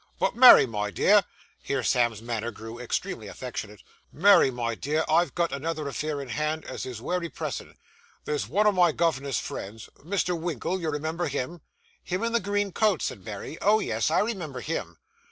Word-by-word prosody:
'But - - +1
Mary, 250 +1 +9
my 105 -4 -3
dear' 205 - +4 0.4
here 135 -2 -2
Sam's 120 -3 +1
manner 115 -1 -3
grew 110 +1 -9
extremely 125 - -3
affectionate - - -7 0.3
'Mary, 195 -3 +6
my 120 -2 -2
dear, 150 +7 -1
I've 165 -1 +2
got 170 -1 +1
another 155 +1 -3
affair 145 +1 -3
in 135 -2 -7
hand 155 +6 -2
as - - -6
is 120 -3 -7
wery 180 -2 -2
pressin'. - - -6 0.5
There's 150 -1 -2
one 205 +6 +2
o' 210 - +6
my 175 -4 +3
governor's 140 -6 0
friends 105 +3 -7
Mr. 180 +2 -1
Winkle, 170 +2 -3
you 160 - -1
remember 160 +3 -2
him?' 145 +4 -4 0.4
'Him 185 +4 -3
in 230 0 -1
the 235 - +3
green 205 0 -1
coat?' 210 -1 +1
said 100 -7 -4
Mary. 110 +8 -7
'Oh, 210 +2 +5
yes, - - 0
I - - +3
remember 185 - -3
him. 85 - -4
155 Hz, 180 wpm, -26 LUFS, 125-180 Hz, 0.5 s, Mary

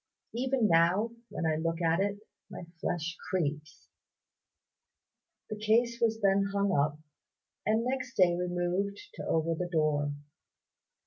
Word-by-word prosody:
Even 250 -1 +1
now 175 +7 +3 0.2
when - - -3
I 155 -1 +1
look 165 +1 -1
at 165 0 +2
it 200 +1 -1 0.3
my 180 -2 -8 0.2
flesh 170 +1 -2
creeps." 150 -4 -2 1.7
The - - -1
case 235 +2 +2
was 225 -1 +1
then 195 0 +3
hung 200 -1 +1
up, 145 +1 +1 0.7
and 220 +2 +2
next 260 0 -3
day 175 -2 +5
removed 180 +3 -1
to - - -7
over 165 +1 +1
the 175 +2 -3
door. 150 -3 +1
180 Hz, 130 wpm, -30 LUFS, 165-215 Hz, 1.7 s, day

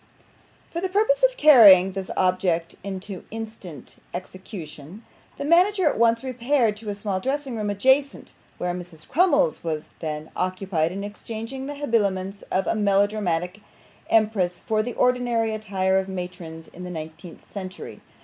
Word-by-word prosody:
For 340 - -3
the 380 - -1
purpose 440 +6 +2
of - - -17
carrying 205 - +8
this 190 0 -5
object 180 -2 +1
into 190 -1 -6
instant 215 - -9 0.2
execution, 185 0 -9 0.3
the 280 - -4
manager 360 +3 +4
at 290 - +1
once 230 +1 +3
repaired 250 -3 +1
to 215 0 -7
a 205 - -3
small 200 -2 -2
dressing 270 +2 -2
room, 210 -2 -2
adjacent, 265 +7 +1 0.2
where 180 0 -2
Mrs. 175 -3 -9
Crummles 295 - +2
was 155 -2 -4
then 155 -1 -5
occupied 185 -3 -1
in 195 +2 -5
exchanging 225 +5 -6
the 290 - -5
habiliments 200 -8 -1
of 190 - 0
a - - +1
melodramatic 200 -3 +1 0.5
empress 205 -6 +2
for 215 -1 0
the 240 +2 -4
ordinary 240 -3 +1
attire 190 -3 0
of 190 0 -4
matrons 180 -3 -7
in 180 - -11
the 180 - -6
nineteenth 160 +1 -9
century. 185 -2 -8
200 Hz, 150 wpm, -24 LUFS, 180-240 Hz, 0.5 s, carrying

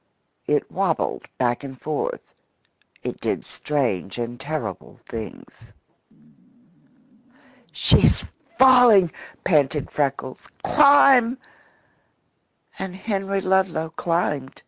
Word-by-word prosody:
It - - 0
wabbled - - -2
back 120 +2 0
and 135 -2 -9
forth; 155 -1 -4 0.7
it - - -6
did - - -2
strange 120 -11 -3
and 120 +1 -5
terrible 150 +2 -6
things. 110 -2 -10 2.0
"She's - - +3 0.3
falling!" 245 -9 +6 0.3
panted 150 -4 +1
Freckles. 135 -2 -3 0.2
"Climb!" 275 -4 +5 1.4
And 190 -1 -5
Henry 195 -1 -2
Ludlow 185 -4 0
climbed. 160 -5 -2
160 Hz, 80 wpm, -22 LUFS, 135-195 Hz, 2.0 s, falling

